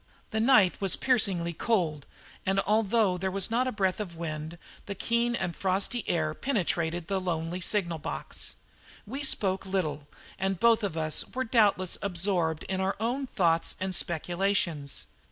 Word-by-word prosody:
The 220 - -1
night 220 -7 +4
was 195 -3 +2
piercingly 190 -9 +1
cold, 165 -8 0 0.4
and, 195 +1 +1
although 210 -3 +2
there 190 +1 -1
was 195 +2 0
not 250 +3 +2
a - - 0
breath 190 -3 0
of 185 -5 -5
wind, 160 0 -5 0.3
the 200 - -4
keen 235 +4 +1
and 185 -6 -3
frosty 195 +5 0
air 155 -2 0
penetrated 175 - -1
into - - -26
the 190 - +1
lonely 170 0 -2
signal 170 -4 0
box. - - -4 0.5
We 270 +7 -5
spoke 195 -8 +4
little, 155 -7 -2 0.3
and 190 -1 -1
both 230 -1 +5
of 195 -6 -3
us 155 -1 +2
were 260 - 0
doubtless 210 -6 +2
absorbed 175 -4 0
by 190 - -2
our 190 +1 0
own 250 +5 -1
thoughts 165 -8 +2
and 190 0 -2
speculations. 175 -4 -1
190 Hz, 160 wpm, -28 LUFS, 170-215 Hz, 0.5 s, both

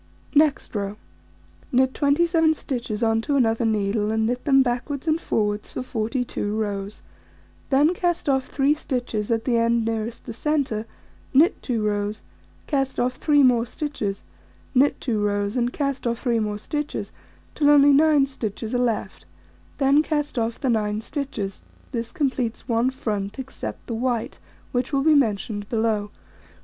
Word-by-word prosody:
Next 300 -3 +2
row: 205 -1 -3 0.7
Knit 260 +1 +3
27 320 +2 +3
stitches 240 -6 -3
on 225 0 +2
to 285 +5 -1
another 230 -3 +2
needle, 210 -1 +1
and 220 0 +1
knit 245 +2 -2
them 270 -2 +5
backwards 260 +4 -3
and 315 +1 +2
forwards 210 -1 -1
for - - -3
42 230 -3 -2
rows: 205 -1 -3 0.7
then 290 +5 +4
cast 350 -2 -1
off 265 -2 +1
3 280 +1 +2
stitches 245 -8 -3
at 225 -1 0
the 240 -3 +2
end 230 0 +2
nearest 225 +1 -3
the - - -6
centre, 255 -5 -1 0.5
knit 325 +8 +5
2 235 -5 -1
rows, 210 0 -1 0.4
cast 270 -3 -1
off 250 +1 0
3 290 -2 +4
more 245 -3 +4
stitches, 235 -6 -4 0.5
knit 275 +2 +3
2 225 -5 -1
rows, 205 +1 0
and 245 -1 +1
cast 275 -3 -2
off 235 0 0
3 240 -2 0
more 210 -1 -2
stitches, 295 +7 -4 0.4
till 290 -1 +3
only 285 -1 +7
9 295 -1 +5
stitches 225 -4 -5
are 245 - +1
left, 220 - -2 0.5
then 275 +2 +4
cast 295 -4 -1
off 225 0 -2
the 270 - -2
9 210 -1 0
stitches; 225 -7 -4 0.3
this 235 -3 -3
completes 260 -8 -2
1 235 +2 +2
front, 210 -6 -3
except 265 0 -6
the 235 - -4
white, 235 0 -2 0.3
which 245 +1 -1
will 275 -1 +1
be 315 +1 +5
mentioned 210 -6 0
below. 220 -3 0
245 Hz, 160 wpm, -24 LUFS, 220-280 Hz, 0.7 s, only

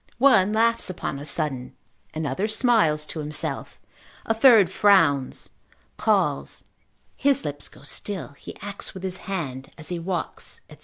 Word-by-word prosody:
One 235 -7 +5
laughs 230 0 +2
upon 170 -6 -4
a 145 - -8
sudden, 140 -5 -3 0.4
another 155 +5 -2
smiles 215 -10 +3
to 155 - -7
himself, 150 0 0 0.5
a 225 - +1
third 225 -4 +6
frowns, 165 -11 +3 0.5
calls, - - 0 0.5
his 275 - +1
lips 145 -1 -4
go - - -18
still, 165 - -3
he 140 - -12
acts 200 -1 -6
with 190 - -8
his 185 -1 -4
hand 135 -9 -4
as 155 -2 -8
he 175 -1 -3
walks, 175 0 -4
&c. - - -13
180 Hz, 145 wpm, -24 LUFS, 150-210 Hz, 0.5 s, third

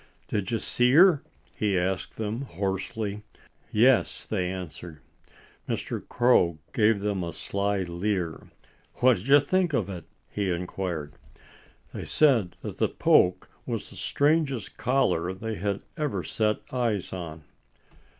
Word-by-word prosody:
"Did 100 -3 -1
you 115 - +1
see 125 +2 +2
her?" 170 -1 +7 0.3
he 100 -3 0
asked 90 +1 -2
them 110 +3 -3
hoarsely. 100 0 -3 0.5
"Yes!" 120 +3 +3
they 90 -4 -1
answered. 90 -3 -7 0.7
Mr. - - -3
Crow 120 -10 +3 0.2
gave 110 -2 +3
them 100 -3 -1
a 85 - -4
sly 100 +1 -1
leer. 90 -1 -3 0.5
"What 125 -2 +4
do - - -8
you 140 +2 +7
think 175 +3 +1
of 105 -7 0
it?" 90 -4 -7 0.2
he 100 -2 -2
inquired. 85 -3 -3 0.8
They - - -5
said 125 - +3
that - - -6
the - - +2
poke 90 0 +3 0.2
was - - -4
the - - -12
strangest 145 -6 0
collar 95 -9 +1
they 110 +4 -4
had 100 +2 -2
ever 140 - -1
set 105 +6 0
eyes 115 -7 -1
on. 80 -4 -6
100 Hz, 135 wpm, -27 LUFS, 90-125 Hz, 0.8 s, her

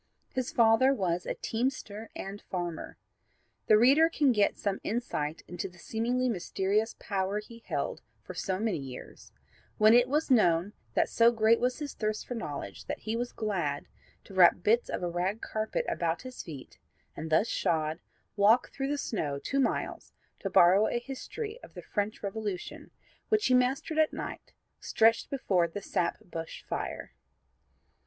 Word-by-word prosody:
His 255 -2 -2
father 235 +4 +5
was 180 -4 -1
a - - -2
teamster 225 -3 -3
and 195 +1 -6
farmer. 175 -3 -4 0.7
The 215 - +7
reader 275 +8 +6
can 295 -5 +3
get 210 -4 +2
some 200 -1 -2
insight 165 -9 -2
into 175 - -5
the 175 - -19
seemingly 240 +6 -1
mysterious 205 +1 0
power 195 -1 -2
he 230 +2 -8
held - - -2 0.2
for - - -8
so 190 -2 -2
many 215 -7 0
years, 130 -2 -10 0.5
when 215 +1 +6
it 245 +1 +6
was 300 +1 0
known 180 -4 +4 0.2
that - - +3
so 230 0 +5
great 225 0 +4
was 250 +1 0
his 295 -2 -5
thirst 215 -1 -2
for - - -5
knowledge 145 - -6
that - - -5
he 220 +1 -2
was 245 +1 -2
glad 175 -10 -2 0.4
to - - -14
wrap 175 -1 +6
bits 230 +4 +3
of - - -3
a - - 0
rag 180 +5 -1
carpet 220 - -2
about 170 +3 -1
his 255 -1 -7
feet 145 -6 -10 0.4
and 160 - -5
thus 160 +8 +3
shod 160 -4 0 0.4
walk 215 +4 +4
through 270 0 -3
the 290 - 0
snow 155 - -2
two 265 - -2
miles 270 - -1 0.3
to 195 - -3
borrow 185 +3 +6
a - - 0
history 420 - -6
of - - -14
the - - -8
French 210 +1 -3
Revolution, 200 -2 -5 0.4
which 430 -1 +2
he 255 - +3
mastered 265 +5 +2
at 315 - +3
night, - - -7 0.3
stretched 225 +1 +3
before 190 -10 +1
'the 195 +4 -7
sap 170 -3 0
bush 165 -2 -7
fire.' - - -5
215 Hz, 165 wpm, -30 LUFS, 180-245 Hz, 0.7 s, The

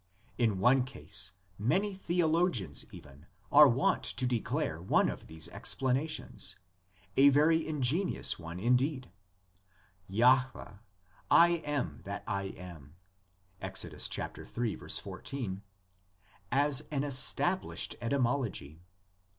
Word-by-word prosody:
In 110 -5 +2
one 125 +6 +4
case 95 - -4 0.3
many 190 - +1
theologians 165 - 0
even 70 +3 -14 0.2
are 150 0 +9
wont 130 +2 +1
to 130 - +2
declare 115 -9 -2
one 90 - +2
of - - -7
these 80 0 -6
explanations, 135 +4 -1 0.6
a 140 +1 +8
very 155 +3 +3
ingenious 155 - 0
one 85 +1 -7
indeed 125 - 0 1.0
(Jahveh 120 -1 +2 0.3
= - - -31 0.2
"I - - +1
am 140 - -3
that - - -5
I 100 0 -2
am," 85 -6 -10 0.7
Ex. - - -1
iii. 120 -3 -3
14) 105 -9 -5 0.9
as 140 +1 +2
an 140 -2 -1
established 145 +6 +1
etymology. 120 - -1
125 Hz, 100 wpm, -31 LUFS, 95-145 Hz, 1.0 s, are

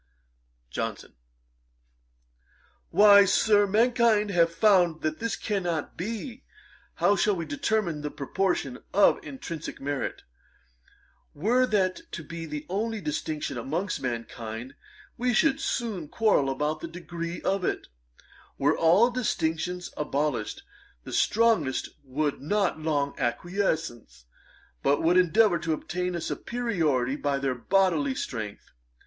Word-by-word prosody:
JOHNSON. - - -4 1.8
'Why, 205 -1 +8
Sir, 205 +1 +4
mankind 225 -1 +3
have 170 -2 +3
found 175 -4 +3
that 155 0 -1
this 230 0 -1
cannot 175 -7 -2
be. 230 - -5 0.5
How 205 - +3
shall 200 +2 +2
we 170 -2 -4
determine 215 - -1
the 150 - -3
proportion 145 -2 -2 0.2
of 205 - +5
intrinsick 170 - -7
merit? 140 0 -3 1.1
Were 240 - +2
that 205 - 0
to 170 - -5
be 165 +2 -7
the 150 -1 -5
only 220 +4 -2
distinction 150 -5 -3
amongst 165 - -2
mankind, 115 0 -5 0.5
we 245 -1 +1
should 275 +2 +3
soon 210 - -2
quarrel 205 -11 +2
about 150 +3 -1
the 170 - -6
degrees 170 0 -6
of 195 -1 0
it. - - -2 0.7
Were 145 +3 +2
all 185 +9 +4
distinctions 180 -7 -2
abolished, 145 -6 -2 0.4
the - - -8
strongest 215 - +2
would 145 +2 -2
not 190 +2 0
long 145 -3 0
acquiesce, 125 - -2 0.6
but 140 +3 +2
would 175 +3 +4
endeavour 185 +1 +4
to 160 0 -1
obtain 180 +3 -3
a 170 - -3
superiority 160 - -1
by 145 -2 0
their 135 -1 -1
bodily 150 +1 +1
strength. 110 -5 -5
170 Hz, 120 wpm, -27 LUFS, 145-205 Hz, 1.8 s, Why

